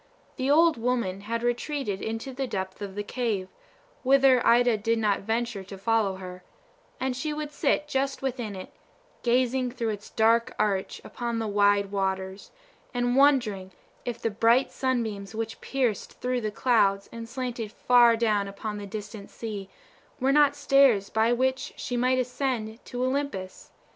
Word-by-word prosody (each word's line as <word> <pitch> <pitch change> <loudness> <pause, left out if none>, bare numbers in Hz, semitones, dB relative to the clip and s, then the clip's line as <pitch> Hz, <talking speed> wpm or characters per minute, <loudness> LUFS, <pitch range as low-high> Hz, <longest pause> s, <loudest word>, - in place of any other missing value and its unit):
The 260 +1 -2
old 325 0 +5
woman 230 -5 -1
had 230 +3 -3
retreated 240 -3 -2
into 225 +4 -4
the 265 +1 -3
depth 190 -3 -4
of 195 -1 -6
the 205 - -3
cave, 205 -5 -2 0.5
whither 265 -1 +5
Ida 240 0 +5
did 225 +2 0
not 210 -3 +1
venture 225 -1 -2
to 195 +1 -9
follow 210 -1 +1
her; 185 -1 -9 0.6
and 260 -1 -1
she 300 +4 -3
would 300 -1 -4
sit 295 0 0
just 275 -1 -1
within 240 -6 -3
it, 185 - -8 0.5
gazing 250 +1 +1
through 240 -2 -3
its 210 -1 -5
dark 230 +1 +2
arch 200 -3 -1
upon 235 -1 -4
the 225 -1 -2
wide 205 -1 +3
waters, 190 -1 -2 0.5
and 245 0 +1
wondering 240 -10 +3 0.3
if 240 -1 -4
the 225 - -1
bright 230 +5 +3
sunbeams 220 -6 -2
which 225 0 -4
pierced 250 -7 -2
through 250 0 -1
the 215 - -1
clouds, 200 -3 +2
and 230 0 -8
slanted 240 -4 -4
far 240 0 +5
down 210 -3 +1
upon 210 +1 -5
the 205 - -7
distant 210 0 -7
sea, 205 -4 -6 0.5
were 265 +1 +2
not 295 -1 +5
stairs 260 -8 +4
by 220 +1 +2
which 260 +2 0
she 245 - -4
might 255 +1 +2
ascend 250 -3 -2
to 250 0 -4
Olympus. 260 -9 -3
230 Hz, 160 wpm, -27 LUFS, 205-255 Hz, 0.6 s, old